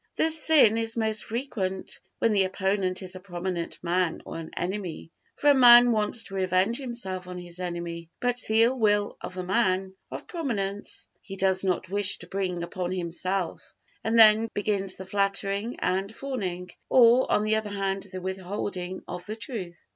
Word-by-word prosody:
This 320 -1 +2
sin 250 -9 +5
is 225 0 0
most 220 -1 +2
frequent 215 -6 -4 0.2
when 230 - +2
the 195 -2 +3
opponent 190 0 -1
is 185 0 -4
a - - -7
prominent 175 -2 -5
man 180 -1 0
or - - -6
an 160 - -8
enemy. 180 -3 -4 0.3
For 290 - +4
a - - +6
man 245 -2 +8
wants 215 +1 +1
to 195 - -12
revenge 190 +5 +1
himself 195 -9 -3
on 180 0 -7
his 175 0 -8
enemy: 170 -2 -5
but 245 0 0
the 220 +1 +4
ill 250 +2 +1
will 205 -2 +2
of 185 - -7
a 185 - -3
man 190 -1 +1 0.2
of - - -7
prominence 205 - -2
he 195 - -9
does 190 0 +2
not 185 -1 -1
wish 200 +1 +3
to 175 - -12
bring 180 -2 -3
upon 180 0 -4
himself; 185 +1 -3 0.3
and 225 +1 +1
then 220 0 +7
begins 200 -2 0
the 190 - -8
flattering 200 +3 -1
and 195 +4 -1
fawning, 185 -10 -5 0.2
or, 245 0 +5
on 210 - +3
the 215 0 +2
other 220 -1 -2
hand, 195 -1 -2
the 185 -1 -6
withholding 185 0 -4
of 180 0 -7
the 215 - -4
truth. 190 -8 -5
195 Hz, 175 wpm, -26 LUFS, 185-220 Hz, 0.3 s, man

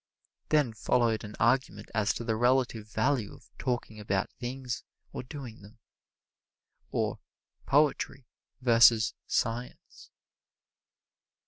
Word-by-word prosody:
Then 145 -7 +3
followed 115 0 +1
an 105 0 -8
argument 115 -3 +1
as 110 0 +2
to - - -4
the 115 -1 0
relative 120 -2 +1
value 120 -1 0
of - - -20
talking 120 -4 -2
about 100 -2 -1
things 125 0 -5 0.3
or - - -4
doing 125 -4 -9
them, 105 +3 -15 1.1
or - - -1 0.5
Poetry 140 -2 +2 0.4
versus 115 -2 +6
Science. 120 +2 -3
120 Hz, 105 wpm, -29 LUFS, 110-130 Hz, 1.1 s, versus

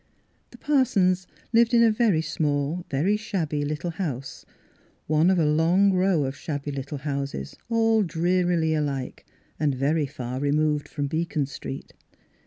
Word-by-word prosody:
The - - -15
Parsons 195 -11 +2 0.3
lived 235 +1 +4
in 235 - +6
a 225 - +5
very 215 -8 +2
small, 150 +2 -1
very 160 +9 +1
shabby 165 -9 -2
little 150 +4 -3
house, 140 -7 -5 0.6
one 155 +3 +3
of 190 - +3
a 165 - +3
long 170 +6 +3
row 185 -4 +2
of 135 +1 -4
shabby 145 -1 -4
little 140 +1 -5
houses, 140 - -4
all 225 -1 +3
drearily 175 -2 +1
alike, 140 -4 -3 0.3
and 145 -3 +1
very 145 +3 +1
far 130 -2 -5
removed 150 +1 +1
from 145 -2 -3
Beacon 160 0 -1
Street. 135 0 -8
155 Hz, 145 wpm, -25 LUFS, 145-185 Hz, 0.6 s, in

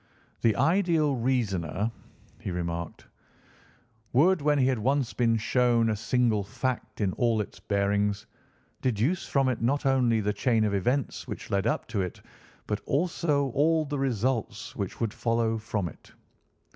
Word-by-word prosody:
"The 110 -3 +3
ideal 160 -1 +2
reasoner," 110 -6 -1 0.5
he - - -5
remarked, 85 -2 -4 1.1
"would, 170 +7 +4
when 150 0 +3
he 130 - +3
had 130 -3 +1
once 135 +2 0
been 115 -2 +2
shown 115 0 +2
a - - 0
single 115 -1 +1
fact 125 +6 -4
in 95 -3 +1
all 115 -3 +1
its 105 - -5
bearings, 100 0 0 0.6
deduce 130 - 0
from 135 -1 +2
it 125 -3 -1
not 140 +5 +1
only 130 -4 +3
all 110 - -1
the 105 - +1
chain 115 +1 +2
of 105 -1 +1
events 125 +8 -1
which - - -7
led 100 +2 +1
up - - -1
to 105 -4 -1
it 90 -2 -4 0.5
but 105 0 -2
also 145 -2 +1
all 155 +4 +2
the 145 -1 -3
results 120 -3 -1
which 100 -3 -4
would 115 -2 -1
follow 115 -1 0
from 105 -4 -2
it. - - -13
115 Hz, 160 wpm, -27 LUFS, 105-135 Hz, 1.1 s, would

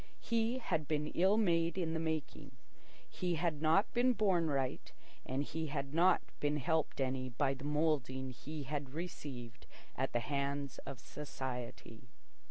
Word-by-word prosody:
He 230 +2 +1
had 165 - -1
been 150 -1 0
ill 190 +4 +4
made 170 -5 +3
in 165 -3 0
the 160 - 0
making. 155 -3 -3 0.5
He 180 -2 -1
had 160 -2 0
not 160 +6 +4
been 250 +1 +4
born 190 -7 +3
right, 135 -3 -1 0.4
and 135 +2 0
he 160 +2 -3
had 140 -1 -3
not 175 +3 +5 0.2
been 150 0 +1
helped 155 +2 0
any 130 -1 0
by 135 +3 +1
the 135 +1 -8
moulding 145 -4 +1
he 150 +4 -6
had 140 0 -4
received 130 -9 -6 0.3
at 130 +1 0
the 120 - +2
hands 140 +2 -2
of 135 -2 -5
society. 125 -4 -6
150 Hz, 155 wpm, -36 LUFS, 135-165 Hz, 0.5 s, not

